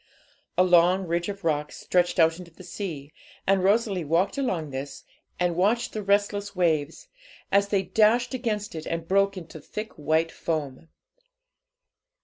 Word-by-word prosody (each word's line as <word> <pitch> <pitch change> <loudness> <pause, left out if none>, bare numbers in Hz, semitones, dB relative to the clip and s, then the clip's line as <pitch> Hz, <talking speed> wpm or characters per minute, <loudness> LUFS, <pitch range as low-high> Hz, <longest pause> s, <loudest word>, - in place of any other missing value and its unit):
A 180 - +6
long 180 +1 +4
ridge 170 +2 -1
of 200 -1 -7
rocks 150 -2 -1
stretched 180 -1 +1
out 165 0 +4
into 180 -2 -10
the 170 +3 -15
sea, 160 -8 -6 0.3
and 195 -1 +2
Rosalie 200 -2 +2
walked 165 +6 +1
along 185 - -2
this, 135 +1 -6 0.4
and 175 -1 +1
watched 210 +7 +1
the 215 - -3
restless 205 0 0
waves, 160 -4 0 0.4
as 200 0 +4
they 200 -1 +1
dashed 225 +6 +2
against 220 -5 -2
it 160 -1 -6
and 165 0 -3
broke 195 +1 +2
into 165 -2 -9
thick 215 +8 -7
white 160 +2 0
foam. 155 -2 -4
180 Hz, 150 wpm, -26 LUFS, 165-200 Hz, 0.4 s, A